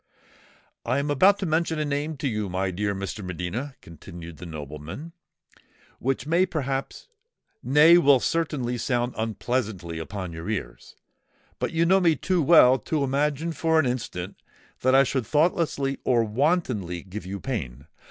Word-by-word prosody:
"I 125 +3 0
am 145 +1 -1
about 190 +8 +5
to 195 - -3
mention 160 0 0
a 155 - -1
name 145 +2 -2
to 145 -1 -2
you, 105 -5 -2
my 95 +1 -1
dear 100 +2 -2
Mr. 100 +2 -5
de - - -7
Medina," 90 - -5
continued 85 0 -11
the 90 - -9
nobleman, 75 - -8 0.9
"which 135 +2 -1
may 170 +5 +2
perhaps—nay, 160 - +1
will 140 -4 +5
certainly 135 -6 -1
sound 120 0 -1
unpleasantly 110 -6 -3
upon 95 +1 -6
your 80 +5 -6
ears; 90 - -5 0.6
but - - -1
you 165 +1 +2
know 190 +3 +5
me 170 -4 +3
too 180 +4 0
well 135 -5 +6
to 150 +5 -1
imagine 145 +4 0
for 160 +1 +2
an 155 - +2
instant 105 -7 -4 0.4
that 130 +1 +3
I 135 - +7
should 130 -4 -2
thoughtlessly 150 -3 +1
or 120 -2 +3
wantonly 110 - -1
give 95 -1 -8
you 100 +1 -5
pain. 70 - -5
130 Hz, 155 wpm, -25 LUFS, 95-155 Hz, 0.9 s, I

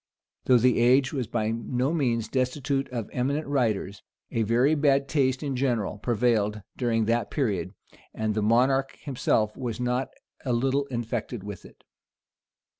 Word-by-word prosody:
Though 125 - +6
the 125 +1 +3
age 125 +3 +4
was 130 -5 -2
by 110 -1 -1
no 125 +5 -1
means 120 -8 0
destitute 135 +2 -1
of 120 -4 -4
eminent 140 +5 -1
writers, 110 -8 -1 0.3
a 115 - 0
very 120 +7 +3
bad 140 -2 +2
taste 130 -2 +1
in 140 -2 -2
general 120 -6 -1
prevailed 110 -3 +1
during 115 -3 +1
that 115 -1 0
period; 100 - -1 0.4
and 110 -1 -2
the 110 - -1
monarch 130 +5 +2
himself 110 -6 0
was 120 -3 -4
not 125 +1 -1 0.3
a 125 - -1
little 135 +4 +1
infected 120 -3 -4
with 105 -1 -8
it. - - -17
125 Hz, 150 wpm, -26 LUFS, 110-135 Hz, 0.4 s, Though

